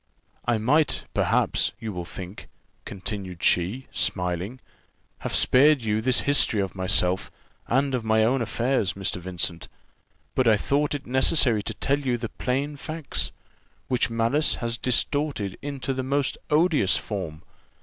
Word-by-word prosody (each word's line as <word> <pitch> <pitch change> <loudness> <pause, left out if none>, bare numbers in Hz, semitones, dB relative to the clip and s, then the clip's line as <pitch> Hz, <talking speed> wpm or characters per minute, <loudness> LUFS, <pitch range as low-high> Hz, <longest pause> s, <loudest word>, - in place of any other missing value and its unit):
"I 120 -2 +2
might, 145 +8 +2
perhaps, - - +1
you 110 -2 -5
will 90 -1 -5
think," 95 +3 -9 0.4
continued 95 -3 -6
she, 100 +10 +1
smiling, 90 +6 -2 0.6
"have - - -3
spared 140 0 +6
you 110 0 0
this 125 +2 +2
history 140 -6 +3
of 95 -2 -2
myself, 95 0 +1 0.4
and 135 +2 +1
of 125 -3 -1
my 110 0 +3
own 125 +3 +2
affairs, 115 -3 0
Mr. 95 -1 -2
Vincent; 90 -1 -3 0.7
but 130 - +1
I 110 -2 +5
thought 145 +6 0
it 140 -1 -6
necessary 130 -3 +3
to - - -5
tell 140 +1 0
you 130 -4 -1
the 115 -1 -5
plain 140 +3 -2
facts, 155 0 -4 0.6
which 125 -1 +1
malice 115 +7 +2
has 115 -1 -2
distorted 130 -5 0
into 140 -1 -4
the 130 - -3
most 140 +1 0
odious 150 - +3
form. 90 -7 -6
120 Hz, 145 wpm, -25 LUFS, 100-140 Hz, 0.7 s, spared